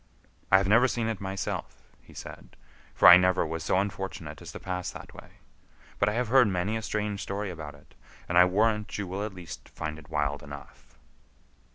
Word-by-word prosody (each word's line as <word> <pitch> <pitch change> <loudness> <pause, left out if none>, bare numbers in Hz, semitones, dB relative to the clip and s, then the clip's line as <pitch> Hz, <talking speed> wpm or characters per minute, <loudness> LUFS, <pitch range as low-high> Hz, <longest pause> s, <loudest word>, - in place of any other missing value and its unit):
"I 95 - +8
have 95 0 +1
never 115 +5 +5
seen 120 -2 -2
it 110 -4 -3
myself," 95 0 -5 0.2
he - - -18
said, - - -10 0.4
"for - - +6
I 90 - +12
never 90 -1 +2
was 80 0 -4
so 90 - +1
unfortunate 95 0 -4
as - - -9
to - - -7
pass 90 -1 -4
that - - -10
way. - - -13 0.7
But - - +3
I - - -2
have 120 0 -1
heard 130 -1 +6
many 95 +3 -1
a 110 - -2
strange 105 -2 -3
story 100 0 -3
about 80 -4 -8
it, - - -21 0.3
and 85 - -2
I 90 +1 +8
warrant 105 +3 +1
you 105 - -3
will 95 +3 -4
at 105 -2 -5
least 90 -3 -10
find 75 0 -6
it 75 - -16
wild 75 -2 -1
enough." 70 0 -12
95 Hz, 205 wpm, -28 LUFS, 85-105 Hz, 0.7 s, I